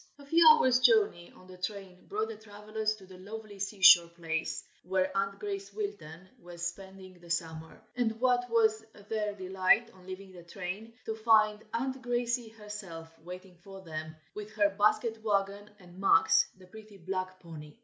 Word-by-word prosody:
A 285 - -14
few 330 +3 +5
hours 260 -5 +6
journey 215 -8 +3
on 185 - -17
the 185 -1 -14
train 185 -1 -6
brought 215 +2 -2
the 225 - -6
travelers 215 +1 -4
to 195 -3 -15
the 185 -1 -14
lovely 210 +1 -9
sea 200 0 -5
shore 170 -2 +9
place 165 -1 -4 0.2
where 185 +1 -1
Aunt 195 0 -1
Grace 200 -1 -5
Wilton 190 -5 -6
was 175 0 -7
spending 190 0 -8
the 170 0 -16
summer: 160 -1 -4 0.2
and 225 -2 -1
what 245 0 +2
was 220 -1 +2 0.3
their 210 -2 -2
delight 190 +4 +2
on 185 -1 -18
leaving 190 +1 -8
the 180 -1 -12
train, 195 +5 -7
to 220 - -2
find 215 -1 +4 0.2
Aunt 260 +2 -2
Grace 240 -1 -1
herself 205 -7 -8
waiting 180 +1 -11
for 195 -1 -11
them, 155 -2 -7 0.2
with 210 0 -7
her 205 -1 +3
basket 215 +3 +1
wagon, 200 -1 -1
and 180 -2 -15
Max, 195 -4 +5
the 185 - -16
pretty 215 +2 -14
black 185 +1 -4
pony. 160 -1 -11
200 Hz, 170 wpm, -30 LUFS, 180-220 Hz, 0.3 s, shore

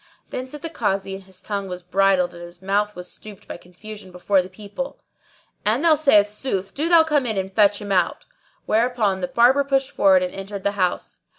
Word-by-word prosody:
Then 255 - -4
said 295 +2 -10
the 330 - -3
Kazi 195 -7 -1
(and 195 0 -8
his 190 -1 -12
tongue 200 -2 -3
was 180 0 -6
bridled 185 -1 +2
and 170 - -11
his 175 0 -10
mouth 205 +2 0
was 180 0 -7
stopped 210 -3 -12
by - - -7
confusion 190 +3 -12
before 185 +2 +1
the 180 - -9
people), 210 +7 -7 0.6
"An 225 +8 +1
thou 330 -2 +6
say 275 -9 +5
sooth, 205 -2 -4
do 310 +4 -1
thou 335 -2 +7
come 295 -5 +1
in 220 -3 -2
and 190 0 -3
fetch 205 -1 +4
him 205 -1 -6
out." 180 -3 +1 0.4
Whereupon 220 -4 +1
the 180 - -1
Barber 245 +8 +4
pushed 270 -1 0
forward 190 -2 +4
and 180 - -4
entered 195 0 -7
the 200 - +1
house. 185 -3 -2
200 Hz, 210 wpm, -22 LUFS, 190-240 Hz, 0.6 s, thou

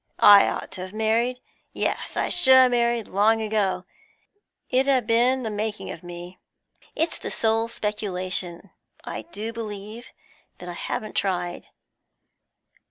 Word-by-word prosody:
I 205 -1 +8
ought - - -4
to 190 -1 -6
have 185 +1 -7
married; 230 +3 0 0.3
yes, - - -2
I - - 0
should 265 -7 +5
ha' 260 -1 +7
married 235 -2 +1
long 215 +3 +3
ago; 200 -4 -1 0.8
it 260 +1 +2
'ud 265 -3 +3
a' - - -20
been 245 +3 +2
the 220 - -3
making 210 +1 -3
of - - -9
me. 175 0 -9 0.6
It's 325 +2 -1
the - - -5
sole 225 0 +1
speculation, 190 -4 -4 0.3
I - - -5
do 220 +2 -4
believe, 215 0 -7 0.5
that 180 - -10
I 175 - -5
haven't 215 +4 -4
tried. 175 -3 -2
215 Hz, 145 wpm, -24 LUFS, 190-235 Hz, 0.8 s, I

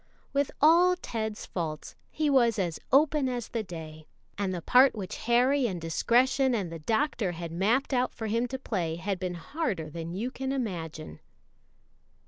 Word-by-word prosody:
With 280 0 +1
all 345 +4 +6
Ted's 220 -10 -4
faults 160 -4 -5
he 310 -1 -1
was 240 -5 +4
as 175 -5 -1
open 290 -1 +4
as 245 -3 -4
the 230 - -2
day, 160 -5 -9 0.3
and 200 -2 -1
the 180 - -3
part 255 +1 +5
which 195 -4 -5
Harry 250 +2 +3
and 185 -5 -4
discretion 245 - +2
and 190 -6 -2
the 165 - -6
Doctor 220 - 0
had 170 -1 -6
mapped 220 - +1
out 250 0 +1
for 225 - -5
him 230 +3 0
to 265 +2 -4
play 180 -10 -2
had 185 +2 -3
been 180 -1 -3
harder 175 - -3
than 165 +2 -6
you 235 +6 -3
can 265 0 -4
imagine. 170 - -4
220 Hz, 170 wpm, -28 LUFS, 175-260 Hz, 0.3 s, all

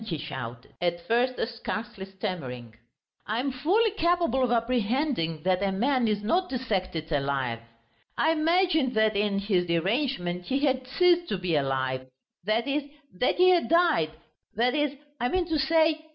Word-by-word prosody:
he 175 -7 -3
shouted, 125 -5 -7
at 175 -1 0
first 250 +2 +1 0.2
scarcely 210 -4 -5
stammering, 140 - -6 0.5
"I 220 +2 -1
am 270 +2 -1
fully 370 - +2
capable 340 - +1
of 250 - +1
apprehending 230 - 0
that 185 0 +1
a 200 -1 +1
man 245 +5 +1
is 210 -1 -1
not 360 - +1
dissected 185 - -3
alive. 135 -5 -1 0.6
I 320 - +3
imagined 320 -4 +2
that 220 -1 +3
in 200 0 +1
his 195 -3 0
derangement 180 - -1
he 270 +1 0
had 260 -2 0
ceased 350 +4 +3
to 200 - -1
be 180 -3 -1
alive... 130 -2 -1 0.4
that 220 +5 +1
is, 285 +2 +1 0.4
that 250 - +2
he 365 +1 +5
had 350 -2 +3
died... 335 - +3 0.5
that 240 +3 +2
is, 295 -1 0 0.3
I 245 - 0
mean 365 +3 0
to 315 -2 +1
say 315 +1 +2
230 Hz, 160 wpm, -27 LUFS, 175-295 Hz, 0.6 s, he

